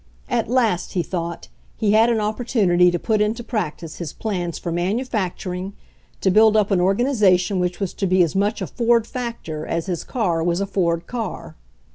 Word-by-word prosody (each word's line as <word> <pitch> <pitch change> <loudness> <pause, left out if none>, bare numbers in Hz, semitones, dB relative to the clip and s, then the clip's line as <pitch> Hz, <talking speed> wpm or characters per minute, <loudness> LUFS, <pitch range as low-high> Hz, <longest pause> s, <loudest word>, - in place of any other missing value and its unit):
At - - 0
last, 230 -8 +1
he 175 - 0
thought, 170 -2 -4 0.3
he 215 -2 +1
had 220 +2 +5
an 230 -2 +2
opportunity 210 -5 +2
to 175 - 0
put 215 +3 0
into 220 +3 0
practice 175 -8 -4
b^s. 170 -3 -6
plans 180 -6 -3
for 170 - -4
manufacturing, 190 -1 -2 0.5
to 190 - +3
build 220 +2 +5
up 210 -1 +2
an 185 -2 +3
organization 195 -3 +2
which 180 0 -1
was 195 -3 -2
to 195 - -1
be 185 0 +4
as 170 - -2
much 205 +1 0
a - - -1
Ford 235 +2 +2
factor 230 -12 -5
as 165 +1 -2
his 180 -3 -3
car 175 -9 -1
was 175 +1 +1
a 200 - 0
Ford 170 -4 0
car. 230 -6 -5
195 Hz, 185 wpm, -22 LUFS, 175-220 Hz, 0.5 s, had